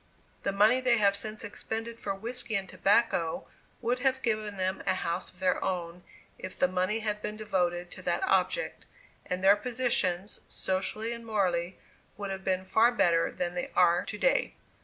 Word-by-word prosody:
The 195 - 0
money 215 +6 +4
they 250 -2 +4
have 200 -2 +4
since 215 +1 -6
expended 225 +1 -5
for 195 -1 -3
whiskey 235 +2 -1
and 195 -1 -1
tobacco, 185 -3 +1 0.3
would 245 +1 0
have 260 0 +1
given 215 -3 -1
them 185 0 -1
a - - +3
house 170 -2 -2
of - - -20
their 185 -1 +1
own, 175 -1 -3 0.4
if 185 - -7
the 180 - +4
money 185 +4 0
had 210 -1 -2
been 210 0 -4
devoted 180 -4 -1
to - - -9
that - - -1
object, 455 +5 0 0.4
and 180 +1 -3
their 195 +1 +7
positions, 210 -5 -1
socially 195 +5 -2
and 235 0 -8
morally, 185 -5 0 0.4
would 200 -1 -4
have 190 0 -5
been 185 0 0
far 225 +5 +4
better 170 -8 +2
than 175 -1 -3
they 175 - -3
are 175 -1 +4
to - - -5
day. - - +2
200 Hz, 180 wpm, -29 LUFS, 185-225 Hz, 0.4 s, their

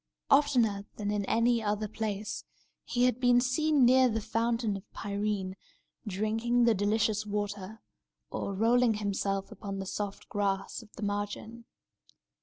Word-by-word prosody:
Oftener 245 -8 +3
than 205 -1 -2
in 205 -1 0
any 230 +2 +2
other 210 0 -1
place, 210 -1 -4 0.4
he 245 - 0
had 250 -1 +3
been 245 -1 +5
seen 275 +2 +3
near 255 +1 +6
the 225 -1 -1
Fountain 230 0 0
of 195 +1 -10
Pirene, 200 -2 -2 0.5
drinking 225 +5 +1
the 235 -1 +5
delicious 210 +1 +1
water, 205 0 -4 0.5
or 200 - -3
rolling 230 +2 +3
himself 195 -1 -2
upon 200 -1 -6
the 195 - -4
soft 200 +1 -4
grass 200 +2 -1
of 220 -2 -17
the 215 - -8
margin. 205 +3 -4
215 Hz, 140 wpm, -30 LUFS, 205-235 Hz, 0.5 s, near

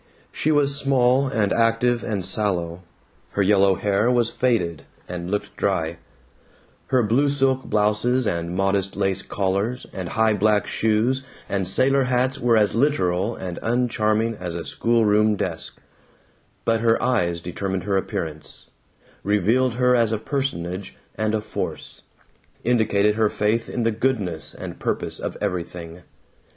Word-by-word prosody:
She 155 - 0
was 145 -2 +3
small 135 -1 +3
and 110 -6 0
active 115 +1 +2
and 100 -5 -2
sallow; 90 -4 -1 0.5
her 100 - +2
yellow 100 -1 +4
hair 100 +4 +1
was 120 -2 +2
faded, 85 - 0 0.2
and 90 0 -5
looked 105 +1 -3
dry; 85 -4 -1 0.9
her 130 -2 +2
blue 125 +7 +2
silk 135 -2 +1
blouses 110 +4 +1
and 85 -2 -2
modest 95 0 0
lace 95 -1 0
collars 100 +6 -2
and 90 -3 -5
high 110 +2 +2
black 105 0 +2
shoes 115 +4 +1 0.3
and 95 -2 -1
sailor 135 +7 +2
hats 130 +2 0
were 120 -1 +3
as 105 -2 +3
literal 110 -5 +1
and 90 -2 -6
uncharming 115 -2 +1
as 90 -2 -5
a 85 - -5
schoolroom 110 -2 +2
desk; - - -4 0.9
but 115 0 +2
her 115 0 +3
eyes 85 -9 +1
determined 95 +2 -4
her 100 -1 -1
appearance, 80 -6 -4 0.5
revealed 110 +5 +2
her 125 0 +3
as 115 -2 +2
a 110 - +1
personage 100 - -3 0.2
and 110 0 -1
a 110 - -1
force, 105 - -5 0.6
indicated 105 -3 +2
her 110 0 +2
faith 110 +3 0
in 120 - -2
the 115 - +2
goodness 105 -8 -2
and - - -8
purpose - - -3
of - - -5
everything. 90 -3 -4
105 Hz, 140 wpm, -23 LUFS, 95-120 Hz, 0.9 s, yellow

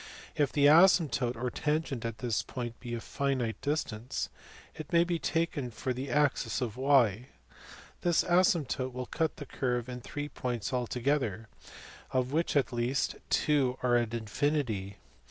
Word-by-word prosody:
If 145 -5 +1
the 145 +3 +3
asymptote 155 -6 +5
or 125 +2 -3
tangent 150 -4 -1
at 115 -1 -3
this 120 -3 -1
point 120 -2 -6
be 120 -2 -6
at - - -1
a - - -7
finite 130 -5 -2
distance, 130 -6 -2 0.4
it 155 -2 -9
may 170 0 +5
be 170 -1 -1
taken 165 -7 -1
for 125 +3 -3
the 130 +2 -5
axis 145 -2 +1
of 120 -5 -3
y. 130 -4 +3 0.7
This 175 -2 +3
asymptote 165 -8 +2
will 125 0 -4
cut 160 +4 -1
the 145 - -7
curve 125 -2 -2
in 125 -1 -6
three 145 +4 -5
points 120 -4 -3
alto 125 0 -2
gether, 115 -6 0 0.6
of 130 0 0
which 160 +2 0
at 135 -3 +2
least 120 +3 0
two 135 -4 +2
are 125 -1 +3
at 120 -1 +1
infinity. 110 -3 -1
130 Hz, 160 wpm, -30 LUFS, 120-145 Hz, 0.7 s, asymptote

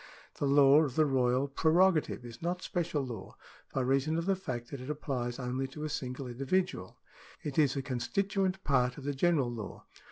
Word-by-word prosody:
The 145 - +1
law 140 +1 +7
of 140 -5 -1
the 155 - +4
royal 130 -1 +2
prerogative 160 -1 +2
is 115 0 -10
not 180 +2 -2
special 165 -5 -1
law, 115 -6 -8 0.4
by 135 - 0
reason 135 +5 +1
of 165 - -1
the 195 0 +2
fact 125 -10 -5
that 140 -3 -6
it 130 - -7
applies 130 -5 -3
only 130 +1 -2
to 150 +3 -8
a 155 - -2
single 130 -1 -4
individual; 135 - -2 0.5
it 145 0 -2
is 145 -3 +4
a 135 - -2
constituent 190 - -1
part 125 -3 +2
of 140 - -8
the 145 +1 -1
general 140 -4 +2
law. 110 -5 -7
140 Hz, 190 wpm, -31 LUFS, 125-160 Hz, 0.5 s, law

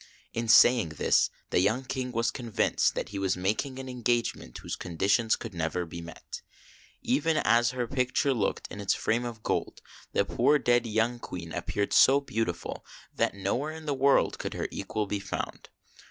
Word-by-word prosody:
In 115 0 -2
saying 115 -3 +6
this, - - +3 0.2
the - - +3
young 110 +8 +1
King 130 -1 -3
was 115 -1 0
convinced 120 -5 0
that - - -3
he 100 -1 -5
was 95 -1 0
making 110 +9 -1
an 135 0 -6
engagement 120 - -1
whose - - -5
conditions 100 +6 +1
could 115 -3 -8
never 85 +1 -2
be 85 +1 -8
met. 85 0 -9 0.6
Even 155 +5 +1
as 120 +2 +3
her 125 -1 -2
picture 130 +2 +1
looked 110 -6 -1
in 100 - -6
its 100 - +1
frame 120 +2 0
of 115 -2 -7
gold, - - -2 0.3
the - - +2
poor 150 - +3
dead 120 -3 +2
young 115 +2 0
Queen 85 -6 -7
appeared 100 0 -2
so 135 +2 +7
beautiful 115 -10 -3 0.3
that - - 0
nowhere 120 +11 -2
in 160 -1 -10
the 145 - 0
world 135 +1 +3
could - - -4
her - - -2
equal 105 -1 -3
be 100 0 -3
found. 100 -1 -5
115 Hz, 180 wpm, -28 LUFS, 100-125 Hz, 0.6 s, so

